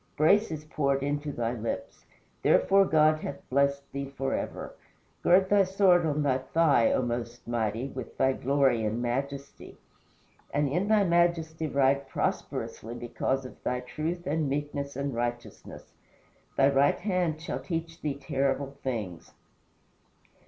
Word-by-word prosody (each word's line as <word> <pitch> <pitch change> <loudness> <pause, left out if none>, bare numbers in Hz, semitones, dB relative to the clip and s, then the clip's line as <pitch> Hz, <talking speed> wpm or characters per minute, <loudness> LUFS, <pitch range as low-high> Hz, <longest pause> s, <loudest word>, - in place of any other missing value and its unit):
Grace 200 +8 +4
is 155 -2 -6
poured 140 -3 0
into 145 +1 -2
thy 120 -3 -2
lips. 115 -1 -5 0.4
Therefore 195 0 +4
God 155 -2 +4
hath 140 -2 -7
blessed 140 +1 +1
thee 140 0 -4
forever. 135 -1 -3 0.5
Gird 190 +2 +5
thy 200 0 +5
sword 185 -3 +3
on 150 0 0
thy 130 -2 +2
thigh, 145 -3 +3
O 130 - +1
most 120 -1 -4
mighty, 115 +2 -1
with 130 -3 -8
thy 130 0 +3
glory 135 -4 +2
and 110 +2 -1
majesty. 140 +3 -4 0.7
And 145 0 +1
in 175 +9 0
thy 215 -1 +4
majesty 170 -3 +1
ride 140 -1 +2
prosperously 115 -2 -3
because 125 +2 -2
of 130 - -11
thy 125 0 -1
truth 160 +7 -4
and 150 0 0
meekness 140 0 -3
and 140 0 -2
righteousness. 120 0 -5 0.6
Thy 135 0 +5
right 140 +1 +3
hand 180 -5 0
shall 160 - -4
teach 165 -1 -5
thee 145 -2 -2
terrible 140 0 -2
things. 105 -10 -5
140 Hz, 140 wpm, -28 LUFS, 130-160 Hz, 0.7 s, Gird